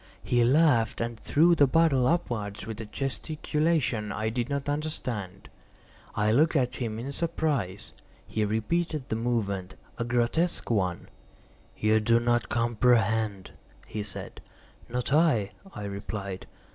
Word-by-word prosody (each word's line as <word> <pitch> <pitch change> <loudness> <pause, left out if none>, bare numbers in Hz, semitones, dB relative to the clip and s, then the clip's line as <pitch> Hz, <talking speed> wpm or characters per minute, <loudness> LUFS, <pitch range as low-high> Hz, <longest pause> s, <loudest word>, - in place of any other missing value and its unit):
He 120 -1 +2
laughed 125 -4 +3
and 115 -1 -3
threw 170 +4 +4
the 145 -4 +5
bottle 135 -4 +3
upwards 110 - -1
with 110 0 -6
a 110 - -7
gesticulation 145 -3 -1
I 110 +2 -1
did 120 +2 -2
not 140 0 -2
understand. 125 - -4 0.7
I 105 +1 +2
looked 155 +8 +3
at 125 -4 +1
him 115 -3 -3
in 125 +5 -4
surprise. 145 - -2 0.3
He 110 - -1
repeated 130 +8 -1
the - - 0
movement—a 110 -2 -3
grotesque 120 +8 0
one. 95 -5 0 0.7
"You 110 +1 +3
do 115 +2 +3
not 120 0 +1
comprehend?" 115 -4 +1 0.3
he 105 - -4
said. 100 -1 -7 0.5
"Not 125 +3 -2
I," 145 -11 +3 0.2
I 105 - -7
replied. 100 -1 -5
120 Hz, 130 wpm, -28 LUFS, 105-145 Hz, 0.7 s, the